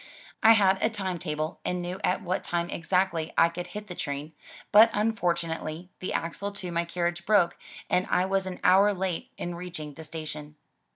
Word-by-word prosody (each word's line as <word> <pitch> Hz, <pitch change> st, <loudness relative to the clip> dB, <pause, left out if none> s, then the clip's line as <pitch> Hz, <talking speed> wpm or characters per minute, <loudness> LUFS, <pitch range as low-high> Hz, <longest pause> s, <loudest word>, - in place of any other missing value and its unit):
I 225 Hz, -, +8 dB
had 195 Hz, -3 st, +4 dB
a 220 Hz, -, +3 dB
time 190 Hz, -5 st, -3 dB
table 155 Hz, +1 st, -3 dB
and 180 Hz, -, -1 dB
knew 180 Hz, +2 st, -4 dB
at -, -, +1 dB
what 185 Hz, +1 st, -1 dB
time 170 Hz, 0 st, -1 dB
exactly 170 Hz, -2 st, 0 dB
I 170 Hz, -, +6 dB
could 175 Hz, +1 st, -6 dB
hit 210 Hz, 0 st, -7 dB
the 185 Hz, -, -7 dB
train, 145 Hz, -1 st, -4 dB, 0.4 s
but 215 Hz, +2 st, +9 dB
unfortunately 175 Hz, -5 st, -1 dB
the 185 Hz, -, -3 dB
axle 185 Hz, +5 st, -2 dB
to 185 Hz, -3 st, -5 dB
my 170 Hz, 0 st, 0 dB
carriage 175 Hz, 0 st, -2 dB
broke 190 Hz, -3 st, +3 dB, 0.3 s
and 185 Hz, -, +1 dB
I 180 Hz, -, +3 dB
was 190 Hz, 0 st, 0 dB
an 185 Hz, -, -6 dB
hour 200 Hz, +2 st, +5 dB
late 185 Hz, -2 st, -2 dB
in 175 Hz, -, -4 dB
reaching 170 Hz, -4 st, -6 dB
the 160 Hz, -, -10 dB
station. 155 Hz, -1 st, -6 dB
175 Hz, 185 wpm, -27 LUFS, 165-190 Hz, 0.4 s, but